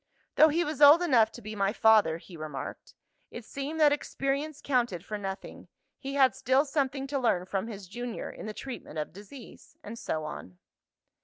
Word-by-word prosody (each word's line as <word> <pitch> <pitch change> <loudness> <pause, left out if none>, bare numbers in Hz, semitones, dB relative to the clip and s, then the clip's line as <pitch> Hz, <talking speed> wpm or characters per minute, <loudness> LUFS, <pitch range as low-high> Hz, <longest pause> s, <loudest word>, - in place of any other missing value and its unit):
Though 310 - +7
he 325 +3 +1
was 300 -3 -4
old 295 +4 +8
enough 235 -9 +4
to 240 - -11
be 215 +1 -6
my 200 -1 +1
father 215 -8 +4
(he 170 +1 -13
remarked) 155 -3 -7 0.3
it 235 - -9
seemed 280 +6 -5
that 300 -2 +6
experience 285 +1 -2
counted 240 - -1
for 215 - -5
nothing; 195 -1 -7 0.3
he 275 0 -5
had 265 -4 +5
still 260 +7 +2
something 275 -2 -1
to 275 0 -2
learn 220 -8 +1
from 195 +3 -3
his 200 -4 -8
junior, 240 +4 -6
in - - -9
the 215 - -5
treatment 250 - -8
of 150 0 -4
disease 210 +7 -13
and 230 +3 -8
so 155 -1 -3
on. 90 -11 -8
240 Hz, 185 wpm, -29 LUFS, 195-280 Hz, 0.3 s, old